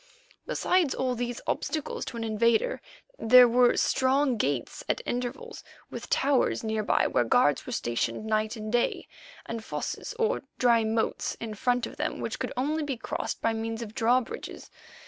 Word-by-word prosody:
Besides 360 -6 +1
all 255 -1 0
these 245 0 -4
obstacles 310 -2 -2
to 235 - -6
an 230 - -3
invader 230 - +1 0.4
there 250 +2 +8
were 245 +1 +4
strong 265 0 +2
gates 140 - -2
at - - +1
intervals, 245 +3 -4 0.3
with - - -7
towers 275 -4 +2
near 220 -1 -1
by 210 - +2
where 120 - +2
guards 125 +4 +2
were - - -5
stationed 120 - -2
night 215 +1 0
and 215 -1 -6
day, 240 0 0 0.4
and 230 -1 -5
fosses 485 - -5
or 460 +1 +1 0.2
dry 235 -2 +4
moats 220 +1 -1
in 225 -1 -5
front 245 +3 0
of - - -10
them - - -2
which - - -4
could - - -3
only 300 +5 0
be 285 -4 -3
crossed - - -4
by 225 - +2
means 225 +1 -3
of 215 -1 -9
drawbridges. 240 +2 -1
235 Hz, 165 wpm, -28 LUFS, 220-255 Hz, 0.4 s, there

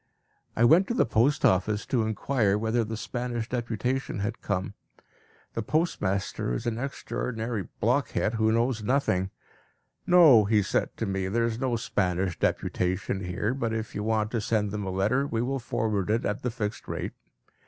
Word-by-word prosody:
I 115 - +2
went 165 +10 +6
to 235 - -1
the - - +3
post 120 +5 +2
office 105 +3 +2
to 125 - +1
inquire 110 -1 +1
whether 115 +2 +1
the 110 0 -4
Spanish 120 -1 -3
deputation 125 +2 -2
had 110 +3 -3
come. 95 -1 -2 0.8
The 115 - -2
postmaster 100 - -1
is - - -4
an 115 -1 -1
extraordinary 120 -5 -3
blockhead 120 -1 +1
who 110 -1 +2
knows 115 0 +1
nothing. 105 -6 +1 0.8
"No," 155 - +7
he 105 0 +3
said 95 - -1
to - - -1
me, 95 -1 -1
"there 115 +4 +1
is 115 -1 -2
no 130 -2 0
Spanish 95 -5 -1
deputation 90 +1 -1
here; 90 +6 -1
but 115 -4 -2
if 110 0 -4
you 105 - -3
want 110 0 0
to 115 - -1
send 105 -2 0
them 105 -2 -3
a - - -1
letter, 105 +9 +1
we 115 - -2
will 135 +2 -1
forward 105 -5 -1
it 115 +2 +1
at 105 - -2
the 125 - -1
fixed 110 -2 -4
rate." - - -4
110 Hz, 175 wpm, -27 LUFS, 105-120 Hz, 0.8 s, No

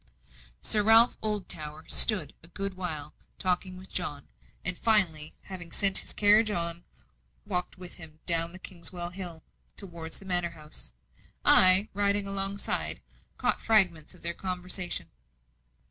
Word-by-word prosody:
Sir 210 - +4
Ralph 225 +3 +5
Oldtower 160 -8 -5
stood 215 -4 +7
a 165 - -14
good 195 +3 -6
while 160 -5 -6 0.2
talking 185 0 -3
with 185 +1 -11
John; 145 -6 -4 0.4
and 180 0 +1
finally, 170 -9 -1
having 175 -3 -10
sent 195 +1 +5
his - - -3
carriage 210 +1 +3
on, 170 -3 -4 0.6
walked 180 +1 -5
with 180 -1 -11
him 160 -2 -13
down 170 +1 -2
Kingswell 175 -1 -6
Hill 175 -4 -9 0.3
towards 170 -4 -7
the 195 - -16
manor 175 -2 -2
house. 155 0 -12 0.5
I, 185 +3 +8
riding 200 0 -1
alongside, 195 0 -2 0.4
caught - - -1
fragments 180 -8 +1
of - - -21
their 170 0 -2
conversation. 180 - -6
180 Hz, 130 wpm, -27 LUFS, 170-195 Hz, 0.6 s, I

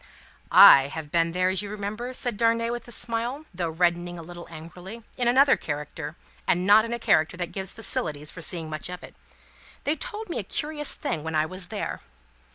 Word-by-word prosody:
"I 135 0 +9
have 150 0 -7
been 165 0 +2
there, 180 +1 +1
as 190 +1 +1
you 205 - -6
remember," 210 +4 -5
said 245 -2 -1
Darnay, 230 +1 +1
with 240 0 -5
a - - -10
smile, 240 +6 -2
though 175 -2 -2
reddening 175 +1 0
a 165 - -8
little 175 +1 -10
angrily, 175 +7 -10
"in 245 -2 0
another 270 +3 +5
character, 150 +1 -6 0.3
and 180 +1 +2
not 210 +2 +6
in 230 - -6
a 235 - -1
character 170 -6 +2
that 175 -1 -4
gives 190 -1 -4
facilities 150 -9 -1
for 165 - -10
seeing 165 -1 0
much 155 +2 -5
of 180 0 -7
it. - - -11 0.7
They 295 - +1
told 440 +2 -6
me 340 - -3
a - - -3
curious 295 +8 -2
thing 160 - -3
when 160 0 -4
I 155 0 +3
was 185 +2 -6
there." - - -4
185 Hz, 205 wpm, -26 LUFS, 165-235 Hz, 0.7 s, I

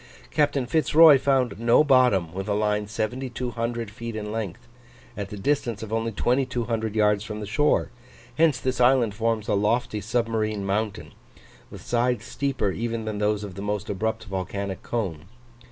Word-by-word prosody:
Captain 145 -3 +1
Fitz 155 +4 0
Roy 155 -4 +9
found 130 -5 +1
no 115 +5 +5
bottom 125 - +3
with 95 +1 -5
a 105 - 0
line 105 0 0
7200 120 0 -3
feet 115 +1 -7
in 105 -1 -4
length, 110 0 -5 0.5
at 100 -2 -5
the 105 - -7
distance 120 -1 -1
of 110 0 -6
only 115 0 -1
2200 120 -2 -1
yards 105 -1 +3
from 105 0 -6
the 105 - -5
shore; 135 +8 +1 0.4
hence 160 -2 +3
this 130 -1 -1
island 120 -4 +4
forms 110 0 -1
a 105 - +1
lofty 105 +1 0
submarine 110 -2 -1
mountain, 105 +1 -2 0.6
with - - -11
sides 120 -1 0
steeper 135 -8 -1
even 115 +2 -3
than 105 -1 -3
those 105 0 0
of 100 -3 -7
the 100 - -7
most 105 0 -3
abrupt 110 +3 -2
volcanic 95 0 -4
cone. 95 -9 -3
110 Hz, 165 wpm, -25 LUFS, 105-125 Hz, 0.6 s, Roy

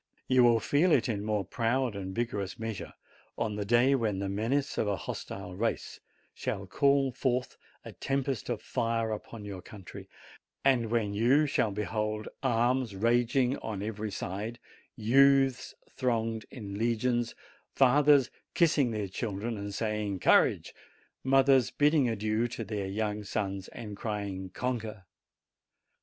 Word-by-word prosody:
You 130 -1 +5
will 120 -1 +5
feel 150 - +2
it 135 - +3
in 105 -4 -2
more 105 -2 -1
proud 120 +2 0
and 95 -1 -5
vigorous 105 -5 -2
measure 110 -3 -5 0.4
on 110 -2 -1
the 105 - -2
day 120 +5 +4
when 110 -7 0
the 100 0 -2
menace 115 +8 -1
of - - +1
a 100 - +1
hostile 90 0 -6
race 115 +4 -2 0.3
shall 95 - -4
call 140 +7 +2
forth 125 +1 -1 0.3
a - - -7
tempest 135 -3 -2
of - - -3
fire 115 -1 -1
upon 110 0 -6
your 100 -3 -6
country, 95 0 -11 0.6
and 125 -4 +3
when 110 -3 0
you 125 +8 +4
shall 115 -6 +1
behold 105 +1 -2
arms 120 -2 +1
raging 120 +5 +2
on 105 -3 -5
every 110 0 -4
side, 100 +4 -4 0.4
youths 135 +2 +3 0.2
thronging 115 -3 -1
in 100 -5 -7
legions, 120 +1 0 0.4
fathers 140 0 +5 0.2
kissing 150 -6 +3
their 105 -3 -2
children 110 +3 -3
and 100 0 -5
saying, 105 -2 -2
"Courage - - +3 0.3
!" - - -36
mothers 135 -1 +4
bidding 145 -3 +3
adieu 110 +1 0
to 115 -1 -5
their 105 -2 -3
young 105 +1 -2
sons 100 -1 -3
and 105 -3 -8
crying, 100 -3 -4
"Conquer 110 -4 -4
115 Hz, 145 wpm, -30 LUFS, 105-125 Hz, 0.6 s, You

